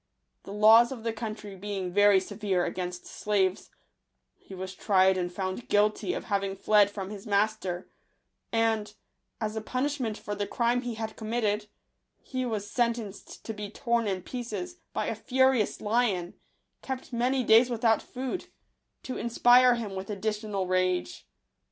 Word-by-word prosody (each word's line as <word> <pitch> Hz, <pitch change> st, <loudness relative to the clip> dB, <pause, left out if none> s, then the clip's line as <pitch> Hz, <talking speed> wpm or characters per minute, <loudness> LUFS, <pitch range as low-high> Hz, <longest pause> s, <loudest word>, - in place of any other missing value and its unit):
The -, -, -8 dB
laws 220 Hz, +4 st, +6 dB
of 240 Hz, -4 st, -7 dB
the 230 Hz, -1 st, -1 dB
country 215 Hz, -2 st, -6 dB
being 190 Hz, -2 st, -4 dB
very 205 Hz, 0 st, +6 dB
severe 195 Hz, -2 st, -1 dB
against 180 Hz, -1 st, -4 dB
slaves, 195 Hz, -2 st, -1 dB, 0.7 s
he 195 Hz, -, -12 dB
was 185 Hz, 0 st, -6 dB
tried 190 Hz, -1 st, +3 dB
and 175 Hz, -1 st, -2 dB
found 185 Hz, +5 st, -4 dB
guilty 210 Hz, -, +2 dB
of -, -, -4 dB
having 195 Hz, -2 st, -1 dB
fled 205 Hz, +1 st, +4 dB
from 200 Hz, -1 st, -6 dB
his 205 Hz, -1 st, -8 dB
master; 200 Hz, -3 st, 0 dB, 0.6 s
and, 225 Hz, -2 st, 0 dB, 0.4 s
as 215 Hz, -1 st, -3 dB
a 220 Hz, -, -2 dB
pun 255 Hz, +5 st, -1 dB
ishment 260 Hz, -7 st, -2 dB
for 205 Hz, -, -5 dB
the 205 Hz, 0 st, -2 dB
crime 240 Hz, 0 st, +1 dB
he 245 Hz, -2 st, -4 dB
had 220 Hz, 0 st, -5 dB
committed* 215 Hz, -2 st, -1 dB, 0.7 s
be 255 Hz, -1 st, 0 dB
was 210 Hz, -3 st, -3 dB
sentenced 235 Hz, -3 st, -3 dB
to 225 Hz, -, -4 dB
be 210 Hz, -1 st, -6 dB
torn 235 Hz, 0 st, 0 dB
in 190 Hz, -2 st, -2 dB
pieces 250 Hz, -, -5 dB
by -, -, -2 dB
a -, -, -1 dB
furious* 260 Hz, -4 st, +2 dB
lion, 210 Hz, -5 st, 0 dB, 0.5 s
kept 265 Hz, -1 st, -6 dB
many 250 Hz, +2 st, +1 dB
days 230 Hz, +2 st, +6 dB
without 225 Hz, -2 st, +2 dB
food, 260 Hz, +7 st, -5 dB, 0.6 s
to 260 Hz, -, -5 dB
inspire 245 Hz, +1 st, +5 dB
him 220 Hz, -4 st, -5 dB
with 190 Hz, +1 st, -6 dB
additional 210 Hz, -1 st, -2 dB
rage. 185 Hz, -, -1 dB
215 Hz, 155 wpm, -28 LUFS, 195-235 Hz, 0.7 s, laws